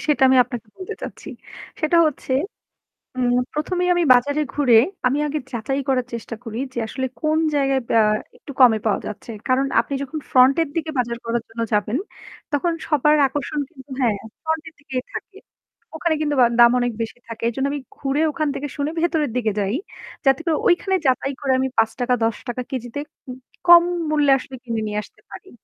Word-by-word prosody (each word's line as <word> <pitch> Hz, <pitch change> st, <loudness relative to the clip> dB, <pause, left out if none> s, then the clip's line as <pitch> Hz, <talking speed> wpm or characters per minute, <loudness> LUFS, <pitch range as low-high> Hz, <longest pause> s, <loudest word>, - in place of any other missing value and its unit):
সেটা 295 Hz, -3 st, +2 dB
আমি 260 Hz, -, +5 dB
আপনাকে 240 Hz, -2 st, -7 dB
বলতে 370 Hz, -1 st, -6 dB
চাচ্ছি। -, -, -8 dB, 0.5 s
সেটা 310 Hz, +2 st, +2 dB
হচ্ছে, 275 Hz, -3 st, -3 dB, 0.8 s
হুম 245 Hz, -1 st, +1 dB, 0.2 s
১ম 305 Hz, +5 st, -2 dB
এই 360 Hz, -, +1 dB
আমি 350 Hz, -, +2 dB
বাজারে 285 Hz, +5 st, +2 dB
ঘুরে 260 Hz, -6 st, +4 dB, 0.3 s
আমি 275 Hz, +3 st, +1 dB
আগে 300 Hz, +1 st, -2 dB
যাচাই 260 Hz, +4 st, -2 dB
করার 255 Hz, -2 st, +1 dB
চেষ্টা 230 Hz, 0 st, -5 dB
করি 225 Hz, -1 st, -6 dB, 0.2 s
যে -, -, -9 dB
আসলে 260 Hz, +3 st, -3 dB
কোন 310 Hz, 0 st, +1 dB, 0.2 s
জায়গায়, 275 Hz, -1 st, +2 dB, 0.2 s
আ -, -, +6 dB, 0.4 s
একটু 285 Hz, -, -11 dB
কমে 245 Hz, -4 st, +7 dB
পাওয়া 215 Hz, -, +2 dB
যাচ্ছে। 215 Hz, +2 st, -7 dB, 0.2 s
কারণ 260 Hz, +2 st, +2 dB
আপনি 235 Hz, +4 st, -2 dB
যখন 305 Hz, +3 st, -5 dB
ফ্রন্টের 270 Hz, +6 st, +5 dB
দিকে 320 Hz, -1 st, -2 dB
বাজার 235 Hz, -1 st, -1 dB
করার 235 Hz, +1 st, -1 dB
জন্য 230 Hz, +1 st, -6 dB
যাবেন 210 Hz, +4 st, +1 dB, 0.5 s
তখন 315 Hz, +4 st, +1 dB, 0.2 s
সবার 300 Hz, 0 st, +3 dB
আকর্ষণ 290 Hz, +2 st, -3 dB
কিন্তু 275 Hz, -4 st, -16 dB
হ্যাঁ, 225 Hz, -5 st, +2 dB, 0.3 s
ফ্রন্টের 320 Hz, 0 st, -3 dB
দিকে 265 Hz, -3 st, -6 dB, 0.2 s
থাকে। -, -, -7 dB, 0.6 s
ওখানে 320 Hz, 0 st, 0 dB
কিন্তু 295 Hz, -1 st, 0 dB
বা -, -, +8 dB
দাম 235 Hz, 0 st, +8 dB
অনেক 245 Hz, 0 st, 0 dB
বেশি 225 Hz, +1 st, -4 dB
থাকে। 230 Hz, 0 st, -8 dB
এইজন্য 265 Hz, +4 st, -1 dB
আমি 290 Hz, -, -3 dB, 0.2 s
ঘুরে 280 Hz, +2 st, -1 dB
ওখান 310 Hz, 0 st, -1 dB
থেকে 290 Hz, -, -3 dB
শুনে 285 Hz, +1 st, -1 dB
ভেতরের 320 Hz, -6 st, +1 dB
দিকে 225 Hz, -3 st, +1 dB
যাই। 200 Hz, +3 st, 0 dB, 0.5 s
যাতে 270 Hz, +1 st, +4 dB
করে 330 Hz, -2 st, +2 dB
ঐখানে 380 Hz, +2 st, +2 dB
যাচাই 270 Hz, +2 st, +1 dB
করে 275 Hz, -2 st, 0 dB
আমি 265 Hz, -, +1 dB
৫ 240 Hz, +3 st, +1 dB
১০ 240 Hz, +2 st, -2 dB
উম -, -, -29 dB
কেজিতে 245 Hz, +1 st, -4 dB, 0.7 s
কম 345 Hz, 0 st, +9 dB, 0.3 s
মূল্যে 295 Hz, -2 st, +3 dB
আসলে 265 Hz, 0 st, -9 dB
কিনে 230 Hz, -3 st, -3 dB
নিয়ে 210 Hz, 0 st, -2 dB
আসতে -, -, -19 dB
পারি। 380 Hz, -, -11 dB
270 Hz, 185 wpm, -22 LUFS, 240-300 Hz, 0.8 s, কম